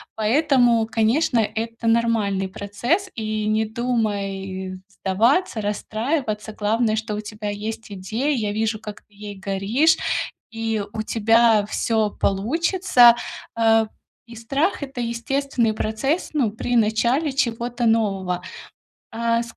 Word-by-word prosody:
Поэтому, 240 Hz, -1 st, +3 dB
конечно, 230 Hz, +4 st, +1 dB
это 230 Hz, +1 st, -3 dB
нормальный 225 Hz, -4 st, +1 dB
процесс, 240 Hz, -, -2 dB
и 215 Hz, -1 st, -3 dB
не 215 Hz, +1 st, +1 dB
думай 200 Hz, -5 st, -3 dB
сдаваться, 220 Hz, -, +1 dB
расстраиваться, 215 Hz, +2 st, -2 dB
главное, 215 Hz, +2 st, +1 dB
что 220 Hz, 0 st, -3 dB
у 210 Hz, -, -3 dB
тебя 210 Hz, 0 st, -6 dB
есть 220 Hz, +2 st, -6 dB
идея. 220 Hz, +10 st, -2 dB
Я 215 Hz, -4 st, -1 dB
вижу, 220 Hz, +1 st, -1 dB
как 210 Hz, -1 st, -9 dB
ты 210 Hz, -, -32 dB
ей 205 Hz, 0 st, -8 dB
горишь, 200 Hz, +12 st, +2 dB, 0.5 s
и 225 Hz, -2 st, -2 dB
у 220 Hz, -, -3 dB
тебя 225 Hz, -1 st, +3 dB
всё 220 Hz, 0 st, 0 dB
получится, 245 Hz, -, +4 dB, 0.4 s
э. 225 Hz, -1 st, +4 dB, 0.4 s
И 235 Hz, -, -11 dB
страх- 275 Hz, -, -1 dB
это 270 Hz, -2 st, -6 dB
естественный 235 Hz, 0 st, -1 dB
процесс, 220 Hz, +10 st, -1 dB
ну, 270 Hz, -8 st, +2 dB
при 245 Hz, +3 st, -2 dB
начале 235 Hz, +7 st, +2 dB
чего-то 240 Hz, -1 st, -1 dB
нового. 195 Hz, -5 st, +1 dB, 0.7 s
А 230 Hz, 0 st, +1 dB
225 Hz, 120 wpm, -22 LUFS, 210-240 Hz, 0.7 s, получится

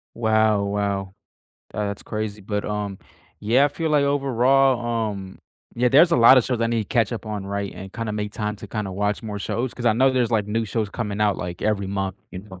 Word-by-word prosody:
Wow, 110 Hz, -2 st, +2 dB
wow. 100 Hz, -1 st, -2 dB, 0.6 s
That's 100 Hz, -1 st, -3 dB
crazy, 110 Hz, -1 st, -4 dB
but 105 Hz, +1 st, -3 dB
um, 105 Hz, -2 st, -3 dB, 0.4 s
yeah, 120 Hz, +7 st, +3 dB
I -, -, +3 dB
feel 160 Hz, +2 st, -3 dB
like 145 Hz, -2 st, +3 dB
overall, 130 Hz, -4 st, +2 dB
um, 95 Hz, -2 st, -8 dB, 0.4 s
yeah, 125 Hz, +1 st, +2 dB
there's 160 Hz, +7 st, +6 dB
a -, -, +3 dB
lotta 125 Hz, +2 st, +8 dB
shows 120 Hz, -1 st, -2 dB
I 115 Hz, -, +2 dB
need 115 Hz, -2 st, 0 dB
to -, -, -26 dB
catch 115 Hz, -3 st, +1 dB
up 115 Hz, -1 st, -6 dB
on, 105 Hz, -2 st, -4 dB
right? 100 Hz, 0 st, -3 dB
And 95 Hz, +1 st, -9 dB
kinda 115 Hz, -2 st, -4 dB
make 105 Hz, 0 st, -3 dB
time 105 Hz, -1 st, -3 dB
to 105 Hz, -, -10 dB
kinda 105 Hz, -2 st, -4 dB
watch 105 Hz, +3 st, -1 dB
more 105 Hz, -2 st, -5 dB
shows 120 Hz, +5 st, -3 dB
'cause 120 Hz, -, -7 dB
I 115 Hz, -, +5 dB
know 130 Hz, +4 st, +3 dB
there's 125 Hz, -3 st, +1 dB
like 105 Hz, -3 st, +1 dB
new 115 Hz, +2 st, -1 dB
shows 110 Hz, 0 st, -2 dB
coming 105 Hz, -3 st, -4 dB
out 105 Hz, -2 st, +2 dB
like 90 Hz, 0 st, -6 dB
every 105 Hz, -2 st, 0 dB
month, 95 Hz, -1 st, -3 dB
you 90 Hz, -, -7 dB
know. 95 Hz, -3 st, -13 dB
105 Hz, 225 wpm, -23 LUFS, 100-120 Hz, 0.6 s, lotta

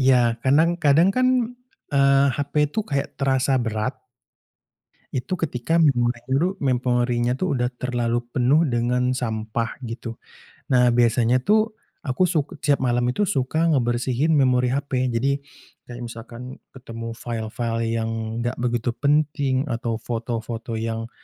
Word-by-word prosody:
iya, 130 Hz, 0 st, +5 dB, 0.3 s
kanang 155 Hz, +6 st, +4 dB
kadang 155 Hz, +6 st, +5 dB
kan, 255 Hz, 0 st, +4 dB, 0.7 s
eee, 140 Hz, 0 st, +5 dB
HP 145 Hz, -1 st, -3 dB, 0.2 s
itu 220 Hz, -, -1 dB
kayak 140 Hz, -1 st, -1 dB
terasa 135 Hz, 0 st, +2 dB
berat 110 Hz, -2 st, -2 dB, 1.2 s
itu 130 Hz, +9 st, -2 dB
ketika 140 Hz, +4 st, -1 dB
memori 120 Hz, -6 st, +3 dB
nyuruh 165 Hz, +9 st, 0 dB
memorinya 125 Hz, -2 st, +1 dB
tuh 185 Hz, 0 st, 0 dB
sudah 125 Hz, -1 st, 0 dB
terlalu 120 Hz, -1 st, -1 dB
penuh 135 Hz, +6 st, +3 dB
dengan 125 Hz, 0 st, +1 dB
sampah, 115 Hz, -2 st, -3 dB
gitu. 115 Hz, 0 st, -6 dB, 0.5 s
Nah, 125 Hz, -2 st, +4 dB
biasanya 120 Hz, +1 st, +3 dB
tuh 215 Hz, -, +2 dB, 0.3 s
aku 155 Hz, +7 st, +1 dB
suk 155 Hz, -5 st, -2 dB
setiap 145 Hz, -2 st, +3 dB
malam 120 Hz, 0 st, +2 dB
itu 205 Hz, +11 st, +1 dB
suka 155 Hz, +1 st, 0 dB
ngebersihin 125 Hz, +3 st, +1 dB
memori 125 Hz, -2 st, +3 dB
HP. 130 Hz, -1 st, -1 dB
Jadi 135 Hz, +4 st, 0 dB, 0.5 s
kayak 120 Hz, 0 st, -7 dB
misalkan 120 Hz, +2 st, -9 dB
ketemu 115 Hz, -3 st, -8 dB
file-file 115 Hz, 0 st, -3 dB, 0.2 s
yang 115 Hz, 0 st, -1 dB, 0.4 s
nggak 120 Hz, -, 0 dB
begitu 120 Hz, -1 st, 0 dB
penting 145 Hz, -1 st, +1 dB
atau 115 Hz, -4 st, -2 dB
foto-foto 115 Hz, 0 st, -4 dB
yang 115 Hz, +1 st, -3 dB
125 Hz, 130 wpm, -23 LUFS, 120-140 Hz, 1.2 s, iya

